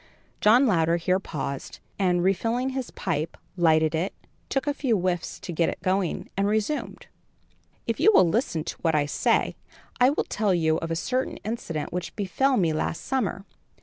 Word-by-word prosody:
John 235 Hz, +6 st, +6 dB
Louder 170 Hz, -6 st, +3 dB
here 180 Hz, +2 st, +1 dB
paused 140 Hz, -6 st, -5 dB, 0.2 s
and, 180 Hz, -2 st, +2 dB
refilling 230 Hz, +7 st, +1 dB
his 265 Hz, -1 st, -4 dB
pipe, 155 Hz, +3 st, -3 dB, 0.2 s
lighted 160 Hz, -2 st, +3 dB
it, 165 Hz, +5 st, -1 dB, 0.3 s
took 270 Hz, -, 0 dB
a 290 Hz, -, +1 dB
few 255 Hz, -6 st, +1 dB
whiffs 180 Hz, -2 st, -2 dB
to -, -, -6 dB
get 165 Hz, +1 st, +2 dB
it -, -, -5 dB
going 185 Hz, -2 st, 0 dB
and 195 Hz, +1 st, +1 dB
resumed: 220 Hz, +8 st, -2 dB, 0.8 s
"If -, -, -2 dB
you 435 Hz, -, +6 dB
will 185 Hz, -, +6 dB
listen 165 Hz, -, 0 dB
to -, -, -6 dB
what 165 Hz, -2 st, +2 dB
I 145 Hz, -1 st, +2 dB
say, 145 Hz, -, +1 dB, 0.4 s
I 250 Hz, +1 st, +6 dB
will 290 Hz, -, 0 dB
tell 205 Hz, -3 st, 0 dB
you 160 Hz, -2 st, +2 dB
of 165 Hz, -, -4 dB
a 165 Hz, -, -1 dB
certain 255 Hz, +9 st, -1 dB
incident 185 Hz, -10 st, -4 dB
which 180 Hz, 0 st, -4 dB
befell 255 Hz, +7 st, +1 dB
me 165 Hz, -5 st, +2 dB
last 155 Hz, +1 st, -2 dB
summer. 215 Hz, -7 st, -1 dB
185 Hz, 180 wpm, -26 LUFS, 165-235 Hz, 0.8 s, John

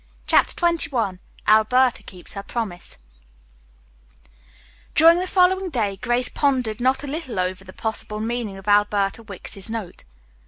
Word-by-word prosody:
CHAPTER -, -, +4 dB
XXI 290 Hz, -, 0 dB, 0.3 s
ALBERTA 240 Hz, +4 st, +4 dB
KEEPS 180 Hz, -2 st, -7 dB
HER 200 Hz, -, -5 dB
PROMISE 200 Hz, -4 st, -5 dB, 2.0 s
During 330 Hz, +2 st, +7 dB
the 370 Hz, -, -2 dB
following 375 Hz, 0 st, +3 dB
day 215 Hz, -, -1 dB
Grace 240 Hz, +4 st, +1 dB
pondered 250 Hz, -6 st, 0 dB
not 260 Hz, +3 st, +1 dB
a -, -, -5 dB
little 280 Hz, -, -4 dB
over 185 Hz, +1 st, -2 dB
the 185 Hz, -, -12 dB
possible 215 Hz, 0 st, -4 dB
meaning 225 Hz, -3 st, -3 dB
of 195 Hz, +1 st, -13 dB
Alberta 205 Hz, 0 st, +2 dB
Wicks's 200 Hz, -1 st, -6 dB
note. 220 Hz, -6 st, -6 dB
225 Hz, 130 wpm, -22 LUFS, 200-265 Hz, 2.0 s, During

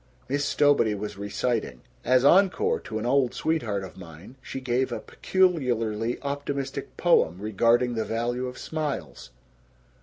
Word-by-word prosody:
Miss 145 Hz, +2 st, 0 dB
Stowbody 145 Hz, -7 st, +3 dB
was 105 Hz, 0 st, -6 dB
reciting. 100 Hz, -, -2 dB, 0.2 s
As 130 Hz, +2 st, +3 dB
encore 200 Hz, -, +4 dB
to -, -, -6 dB
"An 110 Hz, -, -3 dB
Old 130 Hz, 0 st, +2 dB
Sweetheart 115 Hz, -12 st, -1 dB
of 95 Hz, -, -10 dB
Mine," 85 Hz, +6 st, -12 dB
she 135 Hz, -, -6 dB
gave 130 Hz, 0 st, 0 dB
a -, -, -3 dB
peculiarly 120 Hz, -, 0 dB
optimistic 140 Hz, -1 st, -4 dB
poem 85 Hz, +3 st, +3 dB
regarding 115 Hz, +4 st, +2 dB
the 110 Hz, -1 st, -1 dB
value 120 Hz, +3 st, -2 dB
of 125 Hz, 0 st, -8 dB
smiles. 155 Hz, -3 st, -4 dB
125 Hz, 140 wpm, -26 LUFS, 110-140 Hz, 0.2 s, encore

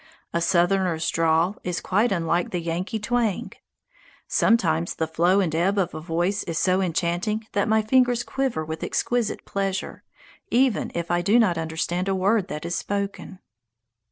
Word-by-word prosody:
A 170 Hz, -, 0 dB
Southerner's 175 Hz, -1 st, +2 dB
drawl 165 Hz, +4 st, +2 dB
is 180 Hz, -1 st, -2 dB
quite 210 Hz, +6 st, +1 dB
unlike 170 Hz, -1 st, 0 dB
the 180 Hz, -, -2 dB
Yankee 170 Hz, +6 st, -3 dB
twang. 220 Hz, -1 st, -1 dB, 0.8 s
Sometimes 170 Hz, -7 st, +2 dB
the 160 Hz, -, -1 dB
flow 170 Hz, +4 st, +2 dB
and 170 Hz, -5 st, -1 dB
ebb 185 Hz, +5 st, +1 dB
of 190 Hz, -4 st, 0 dB
a 155 Hz, -, -6 dB
voice 175 Hz, +5 st, -1 dB
is 165 Hz, -3 st, -3 dB
so 185 Hz, +2 st, +2 dB
enchanting 180 Hz, +5 st, -1 dB
that 200 Hz, -, 0 dB
my 220 Hz, 0 st, +3 dB
fingers 245 Hz, +1 st, +3 dB
quiver 265 Hz, -12 st, -2 dB
with 160 Hz, +1 st, -5 dB
exquisite 240 Hz, -3 st, -1 dB
pleasure, 195 Hz, -1 st, -3 dB, 0.5 s
even 250 Hz, -2 st, +2 dB
if 170 Hz, 0 st, -3 dB
I 175 Hz, 0 st, +2 dB
do 200 Hz, +6 st, +3 dB
not 210 Hz, -7 st, +3 dB
understand 165 Hz, +3 st, -2 dB
a 195 Hz, -, +1 dB
word 195 Hz, +1 st, +2 dB
that 150 Hz, -4 st, -6 dB
is 170 Hz, -, -3 dB
spoken. 200 Hz, -1 st, -4 dB
185 Hz, 160 wpm, -24 LUFS, 170-210 Hz, 0.8 s, my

